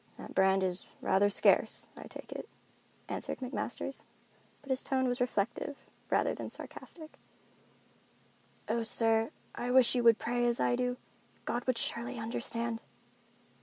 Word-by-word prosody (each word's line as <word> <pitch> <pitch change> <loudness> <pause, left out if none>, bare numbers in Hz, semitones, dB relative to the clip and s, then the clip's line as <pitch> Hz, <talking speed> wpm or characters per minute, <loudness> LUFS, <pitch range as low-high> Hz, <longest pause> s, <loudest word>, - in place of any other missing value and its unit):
"That - - -9
brand 190 0 +4
is 185 0 -1
rather 195 +2 +3
scarce, 200 - +3
I - - -9
take - - -10
it," - - -6 0.6
answered - - -3
McMasters, 260 +1 -4 0.6
but 275 - -5
his 260 - +1
tone 260 -1 +1
was 245 +1 -1
reflective 245 +4 -1 0.3
rather - - +2
than - - -5
sarcastic. 315 -3 -8 1.5
"Oh, 235 - +1
sir, 225 0 +3 0.2
I 245 - -3
wish 250 -1 +6
you 245 -2 +1
would 230 -2 +7
pray 240 +1 0
as 240 0 +1
I 245 - +3
do. 250 0 0 0.5
God 240 0 -1
would 255 -2 +2
surely 240 +2 -1
understand." 230 0 -2
240 Hz, 140 wpm, -32 LUFS, 225-250 Hz, 1.5 s, would